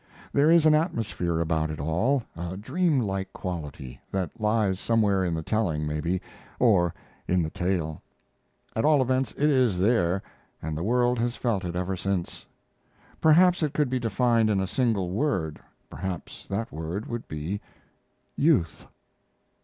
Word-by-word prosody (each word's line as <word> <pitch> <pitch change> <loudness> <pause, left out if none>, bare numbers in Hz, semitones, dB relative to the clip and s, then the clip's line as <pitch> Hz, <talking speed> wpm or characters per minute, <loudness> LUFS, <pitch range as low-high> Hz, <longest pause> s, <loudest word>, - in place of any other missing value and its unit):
There 145 +2 +4
is 165 -1 +6
an 155 - +6
atmosphere 115 - 0
about 80 -1 0
it 75 - -5
all, 105 - +1
a 85 +2 -5
dream 155 - +1
like 95 -3 -3
quality 75 -8 -6
that 95 -5 -1
lies 105 -3 +1
somewhere 105 -4 +2
in 85 -2 0
the 80 - -3
telling, 85 -7 0
maybe, 75 +5 -1 0.4
or 95 -8 +4 0.4
in 90 -1 +2
the 80 - -3
tale; 90 -5 -2 0.7
at 110 - 0
all 150 -3 +5
events 130 +1 0
it 150 - +1
is 125 -8 +3
there, 95 -2 +2 0.4
and 80 -1 -4
the 80 - -3
world 120 +4 +2
has 120 +1 0
felt 110 -6 -1
it 85 -1 -4
ever 90 +1 -1
since. 95 -1 -3 0.7
Perhaps 175 +3 +5
it 150 -3 -1
could 145 -4 +1
be 130 - +1
defined 115 0 +2
in 100 -2 +2
a 95 - 0
single 100 -4 0
word, 95 - -1 0.3
perhaps 90 +4 -6
that 110 +4 -3
word 80 +7 -4
would 120 -1 -5
be 80 +7 -4 0.7
"youth." 140 - +1
100 Hz, 155 wpm, -26 LUFS, 85-125 Hz, 0.7 s, is